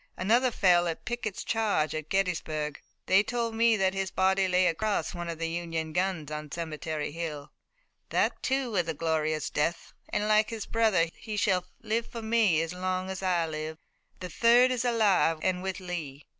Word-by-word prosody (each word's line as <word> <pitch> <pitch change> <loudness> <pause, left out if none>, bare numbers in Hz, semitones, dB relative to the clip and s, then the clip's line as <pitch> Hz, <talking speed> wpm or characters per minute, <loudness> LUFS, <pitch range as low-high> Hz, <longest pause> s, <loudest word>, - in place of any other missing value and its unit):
Another 235 +7 +3
fell 180 -6 +3
in 165 - -1
Pickett's 240 -2 -4
charge 210 -9 0
at 155 -1 -5
Gettysburg. 155 -6 -1 0.2
They 190 +1 +5
told 235 +1 -2
me 225 0 +4
that 190 -1 +2
his 195 -1 -2
body 190 +1 +2
lay 185 0 +3
across 205 +6 0
one 175 -1 -5
of 165 - -4
the 165 0 -2
Union 165 -2 -3
guns 180 -4 -1
on 150 -1 -6
Cemetery 155 -2 -4
Hill. 155 -3 -5 0.6
That, - - +1
too, 265 -2 0
was 180 -5 0
a 165 - -2
glorious 155 -1 -1
death, 165 +3 -1 0.2
and 210 - -1
like 215 0 +4
his 225 -3 -5
brother 220 -7 +2
he 215 -2 -6
shall 185 -3 +1 0.2
live 225 +1 -1
for 230 -1 -7
me 220 -8 +3
as 165 +1 -5
long 185 +1 -2
as 190 - -5
I 180 -3 +1
live. 155 0 -5 0.4
The 180 - -5
third 240 +8 +5
is 250 -1 0
alive 210 -9 +3
and 180 -1 0
with 190 -1 -3
Lee." 160 -6 -6
185 Hz, 185 wpm, -28 LUFS, 160-215 Hz, 0.6 s, They